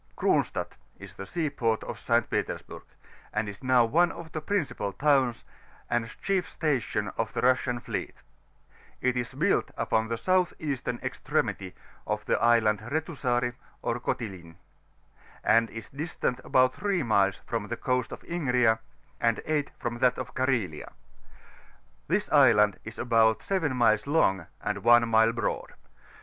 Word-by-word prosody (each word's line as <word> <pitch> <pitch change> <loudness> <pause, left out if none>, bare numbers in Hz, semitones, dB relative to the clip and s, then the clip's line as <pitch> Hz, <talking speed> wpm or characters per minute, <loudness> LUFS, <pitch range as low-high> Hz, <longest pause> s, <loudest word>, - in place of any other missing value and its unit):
C&0H8TAOT - - +1 0.3
is - - -11
the 95 - -8
sea 165 - -1
port 115 -5 0
of - - -6
St. - - +1
Petersburg, - - -3 0.5
and 105 0 -1
is 100 -1 -8
now 130 -2 +4
one 170 +9 +3
of 165 -1 -10
die 155 - -3
principal 155 - -2
towns, 135 -1 +2 0.5
and 120 -1 0
chief 195 -2 0
station 120 -9 -1
of 115 0 -1
the - - -1
Russian 125 -1 +2
fleet; - - -5 0.8
it 125 0 +1
is 125 +1 -3
built 175 +8 +1
upon 110 0 +1
the 115 - -1
soudi 185 +5 +1
eastem 135 -5 -3
extremi^ 90 -2 -2 0.3
of - - -2
the - - +1
Island 115 -3 +4
Betusari, 125 -2 -1 0.3
or 120 - -1
Kotlin, 95 -9 -4 0.9
and 115 0 +4
is^ 115 +4 -10
distant 145 -4 -2
about 130 0 +3
3 195 -3 -1
miles 100 -4 +2
from 115 -3 -3
the 120 - -4
Coast 125 -1 -1
of - - -8
Ligria, 125 -9 +2 0.4
and 115 -1 +2
S 150 -2 +1
from 120 0 -4
that 125 -1 +3
of 130 -1 -6
Carhelia: 120 - -1 1.1
this 190 +6 0
iidand 115 -8 +5
is 110 +1 -9
about 115 -2 +3
7 165 -9 0
miles 110 -1 +3
long, 95 - +2 0.2
and - - -2
one 120 0 +6
mile 110 0 +4
broad. 115 0 -3
120 Hz, 150 wpm, -28 LUFS, 110-145 Hz, 1.1 s, one